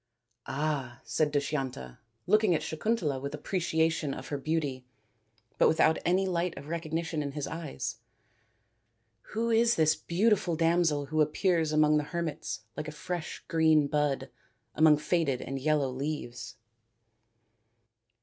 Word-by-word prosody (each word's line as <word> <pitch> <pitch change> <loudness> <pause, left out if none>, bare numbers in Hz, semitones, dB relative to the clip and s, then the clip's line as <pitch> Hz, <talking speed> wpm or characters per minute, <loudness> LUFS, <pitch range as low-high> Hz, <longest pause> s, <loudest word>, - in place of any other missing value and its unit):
" 120 0 -54
Ah," 135 -4 -2
said 150 -1 +1
Dushyanta, 135 - -3 0.3
looking 210 -1 +4
at 155 - -2
Sakuntala 160 - -1
with 140 +2 -4
appreciation 160 -2 0
of - - -8
her 145 - -2
beauty 145 -4 -2 0.8
but - - +6
without 160 0 +3
any 185 +2 +2
light 175 -2 -1
of 145 - -9
recognition 165 -1 -2
in 140 -1 -4
his 145 -1 -3
eyes. 165 - -5 0.6
" 115 -1 -46
Who 230 +1 0
is 230 +1 +4
this 155 -1 +3
beauti 205 +4 +2
ful 175 -5 -2
damsel 165 -3 +2
who 155 +2 0
appears 160 +1 +1
among 155 0 +4
the 150 - +1
hermits 160 -9 -3
like 155 - -5
a - - -4
fresh 165 +3 -5
green 160 -2 +4
bud 140 -2 -1 0.4
among 155 -1 +5
faded 150 -3 0
and 135 +1 -4
yellow 145 -1 +1
leaves 130 -4 -5
155 Hz, 140 wpm, -29 LUFS, 140-170 Hz, 0.8 s, but